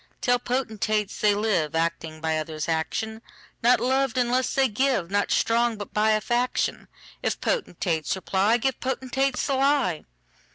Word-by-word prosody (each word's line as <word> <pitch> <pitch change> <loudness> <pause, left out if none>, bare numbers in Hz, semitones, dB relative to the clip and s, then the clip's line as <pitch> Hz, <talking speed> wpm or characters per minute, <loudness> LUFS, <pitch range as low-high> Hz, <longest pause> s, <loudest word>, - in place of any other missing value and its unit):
Tell 245 0 +2
potentates, 220 -4 -1
they 210 -1 +4
liveActing 165 -5 -1
by 160 -1 0
others' 155 0 -4
action; 220 +7 -2 0.4
Not 245 +2 +5
loved 265 -1 +1
unless 250 +1 +1
they 270 -1 +4
give, 225 -6 0
Not 205 0 +1
strong, 235 0 +2
but 205 - -8
by 215 +1 +3
a 215 - +1
faction:If 245 +2 -2
potentates 175 - -1
reply, 195 +4 +1
Give 260 +2 -1
potentates 265 0 -1
the 275 - 0
lie. 270 - +1
220 Hz, 135 wpm, -25 LUFS, 180-255 Hz, 0.4 s, Not